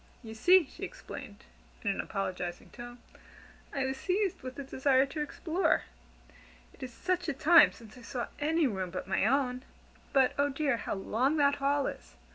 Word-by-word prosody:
"You 220 -1 -8
see," 355 +10 +5
she - - -16
explained, - - -8 0.4
in - - +1
an - - -2
apologizing 185 -3 -4
tone, 240 0 -9 0.7
"I 270 -1 -1
was 265 0 -2
seized 385 +5 -1
with 255 0 -8
a 280 - -4
desire 265 0 +2
to 300 +3 -5
explore. 325 +3 0 0.9
It - - -20
is 255 - -6
such 360 +6 -2
a - - 0
time 330 +5 +6
since 220 -2 -14
I 250 - -13
saw 240 +1 -4
any 315 +2 +2
room 190 -7 -2
but 185 +1 -6
my 195 +2 +1
own! 255 -1 +1 0.5
But 265 -2 +4
oh 285 0 +3
dear, 275 -2 0
how - - -3
long 250 +9 0
that 285 -1 +3
hall 280 0 +1
is! - - -7
270 Hz, 180 wpm, -30 LUFS, 240-300 Hz, 0.9 s, time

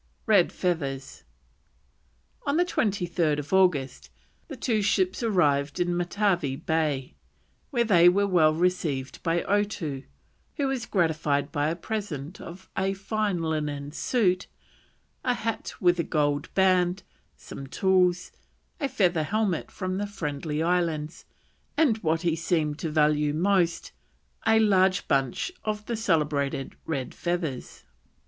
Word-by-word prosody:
RED 205 -7 +4
FEATHERS. 140 -7 -3 1.2
On 280 +2 +2
the 355 - +3
23rd 170 - 0
August 180 -9 +2 0.4
the 285 - -7
two 230 -3 0
ships 190 -1 +1
arrived 150 -10 +1
in 175 0 +1
Matavai 175 -5 0
Bay, 150 -3 -1 0.6
where 240 -3 +1
they 175 -6 +6
were 200 +3 +2
well 160 -5 +4
received 160 -6 -1
by 170 0 0
Otoo, 200 -9 -1 0.5
who 285 - -1
was 265 -3 -2
gratified 155 -5 0
by 145 +1 0
a 165 - -1
present 175 -5 -5
of 185 +3 -10
a 195 0 0
fine 200 -3 -1
linen 150 -3 -2
suit, 185 - +1 0.8
a 250 -1 +1
hat 225 -1 -4
with 175 -2 +3
a - - +2
gold 145 -2 0
band, 185 0 +3 0.3
some 135 - -9
tools, 185 +2 +2 0.5
a 280 - -1
feather 185 -10 +2
helmet 200 +1 -1
from 185 0 -4
the 205 - -2
Friendly 150 -4 -3
Islands, 165 -3 -1 0.5
and, 255 -9 +3
what 165 -3 0
he 170 -2 +1
seemed 160 -3 -1
to 165 - -2
value 150 -1 +2
most, 175 -1 +1 0.6
a 220 0 +5
large 190 -4 +3
bunch 135 - 0
of 210 -1 -3
the 235 - -2
celebrated 150 -9 0
red 135 -6 -3
feathers. 170 -7 -4
175 Hz, 130 wpm, -26 LUFS, 150-200 Hz, 1.2 s, they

